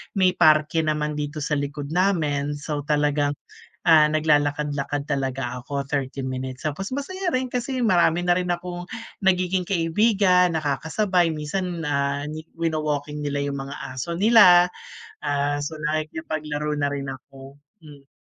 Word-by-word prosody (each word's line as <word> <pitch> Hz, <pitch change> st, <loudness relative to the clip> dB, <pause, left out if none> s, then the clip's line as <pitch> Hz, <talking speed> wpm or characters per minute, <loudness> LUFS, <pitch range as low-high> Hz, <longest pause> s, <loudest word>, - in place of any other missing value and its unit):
may 185 Hz, -2 st, +4 dB
parke 155 Hz, -1 st, +4 dB
naman 150 Hz, -1 st, -1 dB
dito 150 Hz, +1 st, -4 dB
sa 150 Hz, -, 0 dB
likod 145 Hz, 0 st, -5 dB
namin. 155 Hz, -6 st, +1 dB
So, 150 Hz, 0 st, -4 dB
talagang, 145 Hz, -1 st, +1 dB, 0.5 s
ah, 155 Hz, -2 st, +6 dB
naglalakad-lakad 145 Hz, -2 st, 0 dB
talaga 130 Hz, -2 st, -2 dB
ako 140 Hz, +1 st, -4 dB
30 140 Hz, -1 st, -3 dB
minutes, 130 Hz, +2 st, -5 dB
tapos 155 Hz, +7 st, -3 dB
masaya 370 Hz, +7 st, -3 dB
rin 255 Hz, 0 st, +1 dB
kasi 250 Hz, +2 st, -2 dB
marami 175 Hz, -4 st, +3 dB
na 175 Hz, -, +4 dB
rin 180 Hz, 0 st, -2 dB
akong 175 Hz, 0 st, -3 dB, 0.4 s
nagiging 185 Hz, -1 st, +2 dB
kaibigan, 180 Hz, -1 st, +3 dB
nakakasabay 165 Hz, +5 st, +1 dB
minsan, 165 Hz, +3 st, -3 dB
ah, 140 Hz, 0 st, 0 dB
nyi 155 Hz, +1 st, -6 dB, 0.2 s
wino-walking 150 Hz, -2 st, -2 dB
nila 145 Hz, -1 st, -2 dB
yung 140 Hz, -1 st, -3 dB
mga 135 Hz, -, -7 dB, 0.2 s
aso 170 Hz, +6 st, -3 dB
nila. 195 Hz, -4 st, +7 dB, 0.6 s
Ah, 145 Hz, 0 st, 0 dB
so, 155 Hz, +2 st, -4 dB, 0.2 s
nakipaglaro 155 Hz, -1 st, -3 dB
na 145 Hz, -1 st, +1 dB
rin 140 Hz, -1 st, -4 dB
ako, 135 Hz, +1 st, -13 dB, 0.3 s
hmm. 140 Hz, -2 st, -15 dB
150 Hz, 140 wpm, -24 LUFS, 145-175 Hz, 0.6 s, nila